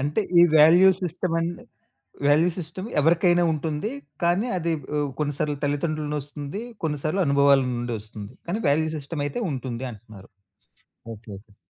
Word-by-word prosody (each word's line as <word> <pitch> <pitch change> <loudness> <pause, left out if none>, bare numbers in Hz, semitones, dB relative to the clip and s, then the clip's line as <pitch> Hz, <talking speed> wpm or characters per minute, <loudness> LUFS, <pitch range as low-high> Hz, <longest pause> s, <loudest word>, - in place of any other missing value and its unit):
అంటే, 145 +9 0 0.2
ఈ - - +9 0.2
value 170 +5 +7
system 180 0 -2
and 170 +1 -3 0.7
value 155 +5 +4
system 180 +5 -6
ఎవరికైనా 175 +2 +3
ఉంటుంది. 155 +7 -3 0.3
కానీ, 180 +7 +2
అది 170 -1 -1 0.2
ఆహ్, 145 -1 0
కొన్నిసార్లు 145 0 -1
తల్లిదండ్రులనొస్తుంది. 145 +2 -3 0.2
కొన్నిసార్లు 155 +5 -1
అనుభవాలనుండొస్తుంది. 120 -7 +1
కానీ, 200 +6 -2
వాల్యూ 160 +2 +2
సిస్టమయితే 145 - -4
ఉంటుంది 130 -1 -4
అంటున్నారు. 110 -3 -14 0.9
ఓకే. 105 0 -13
ఓకే. 105 0 -24
150 Hz, 120 wpm, -24 LUFS, 135-170 Hz, 0.9 s, ఈ